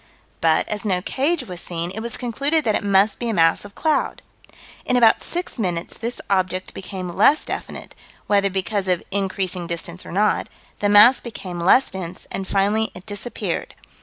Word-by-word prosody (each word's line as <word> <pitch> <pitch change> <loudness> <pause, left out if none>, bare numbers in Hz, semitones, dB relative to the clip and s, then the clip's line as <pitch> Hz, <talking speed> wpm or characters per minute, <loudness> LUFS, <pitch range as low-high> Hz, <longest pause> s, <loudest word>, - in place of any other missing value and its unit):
"But, 160 -1 +3
as 210 -1 -3
no 190 -4 +1
cage 290 +6 0
was 180 -7 -7
seen, 170 0 -4
it 220 - -4
was 230 0 -3
concluded 280 +6 0
that 220 - +1
it - - 0
must 200 +1 +3
be 240 - -2
a 225 - -1
mass 165 -1 +3
of 205 0 -12
cloud." 315 -1 0 0.6
In 250 - +2
about 230 -2 +5
six 350 -6 -3
minutes 175 -5 -2
this 235 +2 -4
object 185 -1 0
became 185 -1 -6
less 280 +9 +4
definite - - -6 0.3
whether 200 -1 +2
because 195 +1 -2
of 180 -2 +1
increasing 190 -2 -2
distance 170 +1 -4
or - - -10
not 205 +4 +1 0.3
"the 205 - +1
mass 210 +5 +8
became 190 -7 -7
less 195 +10 +4
dense, 185 -2 -6
and 190 - -4
finally 205 +2 +1
it 180 - -11
disappeared." 210 +2 -4
200 Hz, 180 wpm, -22 LUFS, 185-230 Hz, 0.6 s, mass